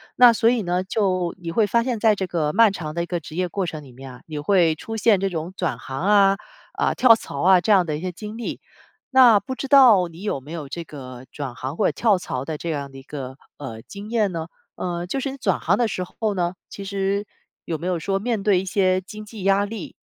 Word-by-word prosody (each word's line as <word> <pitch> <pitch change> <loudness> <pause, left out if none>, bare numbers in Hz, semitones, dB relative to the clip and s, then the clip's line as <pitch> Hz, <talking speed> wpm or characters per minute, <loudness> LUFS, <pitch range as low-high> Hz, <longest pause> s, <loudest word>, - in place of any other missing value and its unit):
那 245 -1 +8
所 225 0 +3
以 240 -3 +1
呢， 180 +1 0
就 185 -3 0
你 170 -1 -5
会 215 +5 +3
发 235 +3 +2
现 240 -3 -2
在 220 -1 +4
这 195 - -2
个 160 -4 -1
漫 215 +2 +5
长 155 -5 -5
的 170 - 0
一 - - -4
个 175 0 -3
职 155 0 -11
业 180 +1 0
过 190 +2 -2
程 155 -3 -6
里 135 - -14
面 135 +2 -11
啊， 125 - -14
你 155 -2 -6
会 170 0 +3
出 225 +8 -6
现 215 -2 +4
这 195 +1 0
种 170 0 -5
转 180 -5 -2
行 135 0 -6
啊， 195 0 +4 0.4
啊， - - 0
跳 245 -3 +6
槽 140 -10 -7
啊， 185 0 +6
这 215 - +1
样 190 -3 +5
的 155 -2 -2
一 - - -8
些 185 0 -3
经 210 +5 -8
历。 235 - -5 0.6
那 240 -5 +8
不 260 - -6
知 275 - -5
道 245 -10 +7
你 170 +3 -12
有 205 -9 -1
没 145 +4 -12
有 160 -4 -5
这 170 +4 -5
个 130 -5 -10
转 140 -4 -5
行 130 +5 -6
或 210 - +1
者 - - +1
跳 215 -5 +2
槽 130 -7 -4
的 155 0 -4
这 170 - -5
样 140 -2 -4
的 135 - -12
一 135 - -11
个， 135 -2 -7 0.2
呃， 130 -6 -7
经 200 +1 -10
验 220 -4 +1
呢？ 165 -2 -4 0.3
呃， 175 -1 -3
就 195 +10 -3
是 275 - -2
你 275 - -8
转 205 -8 0
行 185 +5 +1
的 240 - +2
时 185 -3 -3
候 210 +3 -3
呢， 175 -1 -1
其 200 - -8
实 195 +1 -1 0.4
有 165 - -2
没 165 - -8
有 180 -2 0
说 195 +4 -1
面 220 +1 -1
对 195 -2 +3
一 190 - -4
些 185 -2 +2
经 215 +3 -10
济 210 -2 -9
压 195 +1 +3
力？ 205 -3 -7
185 Hz, 280 characters per minute, -23 LUFS, 160-210 Hz, 0.6 s, 那